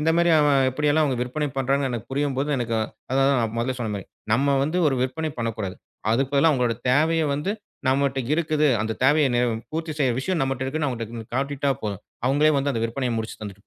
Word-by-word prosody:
இந்த 160 +2 +2
மாரி 170 0 +4
அவன் 140 -3 +4
இப்படி 150 +3 0
எல்லாம் 155 +1 +3
அவங்க 135 -4 0
விற்பனை 150 +4 -2
பண்றாங்க 135 +1 +1
எனக்குப் 120 0 -5
புரியும்போது, 140 0 0
எனக்கு, 120 -2 -2 0.4
அத 135 - +1
அத, 140 - +4
நான் 115 -1 -2
மொதல்லே 125 +2 -1
சொன்ன 110 -3 -2
மாரி, 95 - -8 0.3
நம்ம 140 +3 +3
வந்து 155 +5 0
ஒரு 135 - 0
விற்பனை 155 +5 -2
பண்ணக் 115 -2 -2
கூடாது. 95 -3 -4 0.4
அதுக்கு 135 +3 0
பதிலா, 155 +3 +5
உங்களோட 125 -3 +1 0.2
தேவையை 160 +4 +3
வந்து 150 +7 -2 0.4
நம்மகிட்ட 135 0 +1 0.2
இருக்குது. 155 -2 +1
அந்த 110 0 -1
தேவையை 145 +1 +4
நிவ் 120 -1 +2 0.2
பூர்த்தி 160 0 -3
செய்ற 130 -4 +2
விஷயம் 180 +3 -1
நம்மட்ட 135 -1 -1
இருக்குன்னு, 150 +2 -1
அவங்கட்ட 115 -2 -6
காட்டிட்டா 140 +1 0
போதும். 100 -3 -4 0.2
அவங்களே 145 +4 +4
வந்து 140 0 0
அந்த 115 -1 -2
விற்பனைய 125 +1 -2
முடிச்சு, 110 0 -5
தந்துட்டு 100 0 -9
135 Hz, 205 wpm, -24 LUFS, 120-150 Hz, 0.4 s, பதிலா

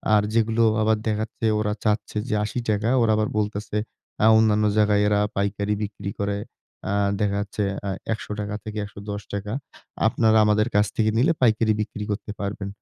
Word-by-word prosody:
আর 105 - +5
যেগুলো 115 0 +2 0.2
আবার 110 0 +3
দেখা 110 0 0
যাচ্ছে 115 - -5
ওরা 105 -1 0
চাচ্ছে 105 0 0
যে - - +1
৳৮০ 110 -1 -1
ওরা 115 -2 +3
আবার 110 0 +1
বলতেছে, 105 0 -2 0.5
আ - - +7
অন্যান্য 110 -1 +3
জায়গায় 105 -1 +4
এরা 105 0 +2 0.2
পাইকারি 100 +1 0
বিক্রি 100 -1 -5
করে। 100 0 -1 0.5
আ - - 0 0.3
দেখা 100 -1 +1
যাচ্ছে 105 0 -3 0.2
অ্যা 100 - -3 0.2
৳১১০-৳১১০, 105 -1 -5 0.5
"আপনারা 110 0 +3
আমাদের 105 +1 +3
কাছ 105 0 +5
থেকে 110 -1 +2
নিলে 145 +8 +4
পাইকারি 110 -2 +3
বিক্রি 105 0 -5
করতে 105 +1 -4
পারবেন।" 100 0 -4
105 Hz, 155 wpm, -24 LUFS, 105-110 Hz, 0.5 s, আ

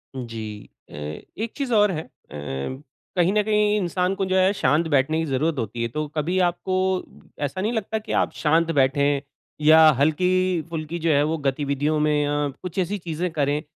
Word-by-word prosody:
जी। 110 -4 -7 0.2
अ, - - -15
एक 75 - -6
चीज़ 275 -4 -2
और 210 -2 +4
है 160 -3 -3
अ, - - -19 1.1
कहीं 180 +1 +3
न 210 - +3
कहीं 210 0 +2
इंसान 180 -1 0
को 195 -1 -1
जो 185 0 0
है 185 +1 +4
शांत 160 -1 +1
बैठने 145 +1 +2
की 165 - 0
ज़रूरत 150 +3 0
होती 115 +1 -4
है। 115 - 0
तो 150 +5 -3
कभी 165 +5 0
आपको 180 +2 -3 0.6
ऐसा 145 +6 -2
नहीं 215 +4 0
लगता 220 -1 -2
कि 215 - -8
आप - - 0
शांत 165 +2 +2
बैठें 140 0 +2 0.4
या 155 +1 +7 0.2
हल्की-फुल्की 170 0 0
जो 165 0 0
है, 145 -1 +4
वो 160 +2 0
गतिविधियों 145 +2 0
में 150 -1 +2
अ, 145 0 0
कुछ 180 0 -4
ऐसी 190 +3 0
चीज़ें 170 0 -3
करें, 145 -1 0
160 Hz, 185 wpm, -23 LUFS, 145-185 Hz, 1.1 s, या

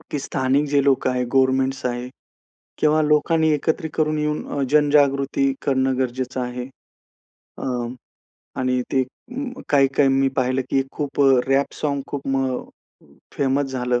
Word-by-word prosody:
की 145 - -2
स्थानिक 135 +1 0
जे 145 0 +3
लोकं 135 -2 +2
आहेत, 125 0 -1
गव्हर्नमेंटस 130 0 +2
आहेत 125 0 -3 0.7
किंवा 155 0 +3
लोकांनी 155 +1 +2
एकत्रित 160 +2 -1
करून 155 -1 +1
येऊन 150 0 -2
अ, 140 - -2
जनजागृती 140 -2 +3
करणं 130 -1 +1
गरजेचं 130 0 -2
आहे. 125 0 -4 0.9
अ, - - -8 1.0
आणि 125 0 +1
ते 130 - +3
अ, 255 - -8
काही-काही 135 -1 +3
मी 135 0 +3
पाहिलं 130 0 +1
की 135 - +2
खूप 145 -1 -3
अ, 135 - +6 0.2
रॅप 135 +1 +1
साँग 140 -2 -1
खूप 140 -1 -6
म 135 -1 0 0.8
फेमस 140 +1 +1
झालं. 125 -1 0
135 Hz, 140 wpm, -22 LUFS, 130-145 Hz, 1.0 s, अ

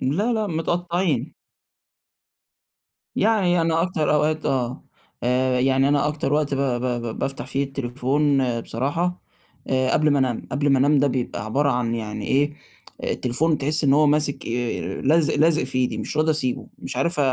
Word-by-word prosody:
لا، 190 - 0
لأ، 215 -2 0
متقطّعين. 170 -4 -1 1.8
يعني 185 -6 +2
أنا 165 0 +1
أكتر 160 -4 0
أوقات 155 +1 +1
آه. 125 -1 -1 0.4
آآ 125 +1 +1
يعني 135 +1 +3
أنا 145 0 +2
أكتر 145 -2 -1
وقت 150 -1 +1
ب - - 0
ب 130 -2 0 0.2
ب 115 -1 -5
بافتَح 135 0 -3
فيه 140 +1 -1
التليفون 135 -1 0
بصراحة 165 +11 -2 0.5
آآ، 130 0 +1
قَبل 155 0 +3
ما 145 - +3
أنام، 125 -3 -1
قَبل 145 +2 +1
ما 135 -1 +4
أنام 145 +2 +4
ده 145 - +3
بيبقى 125 -5 -3
عبارة 140 +5 +1
عن 120 -1 0
يعني 110 -2 -5
إيه 145 +2 +2 0.5
التليفون 150 +6 0
تحِس 155 +3 0
إن 140 -1 +4
هو 150 0 +4
ماسِك 145 -1 0
آآ، 115 -6 -3
لازق 155 +2 +3
لازق 160 -1 +3
في 130 0 -3
إيدي 125 -1 0
مش - - -4
راضي 155 +1 +3
أسيبه، 130 -5 -2
مش - - -6
عارف 170 +5 0
140 Hz, 165 wpm, -23 LUFS, 130-155 Hz, 1.8 s, ما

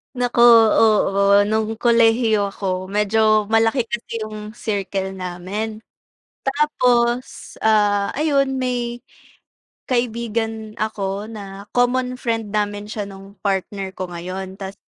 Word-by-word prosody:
Naku, 245 -1 -1 0.4
oo. 200 -2 +4
Nung 220 +1 -1
kolehiyo 225 -2 +3
ako, 185 -1 -3
medyo 215 +1 +2
malaki 225 +3 +3
kasi 230 -1 -5
yung 215 0 -8
circle 195 -3 -3
namin. 190 +4 -5 0.6
Tapos, 250 -4 0
ah, 205 -2 +2
ayun 275 -3 +1
may 245 -1 -2 0.9
kaibigan 225 -3 -2
ako 205 -2 -3
na 200 -2 -9
common 250 +1 +1
friend 225 -4 -2
namin 205 0 -2
siya 210 -2 -4
nung 195 0 -13
partner 195 -1 -2
ko 185 -2 -5
ngayon. 185 +2 -6
Tas 195 -1 -6
215 Hz, 110 wpm, -21 LUFS, 200-235 Hz, 0.9 s, oo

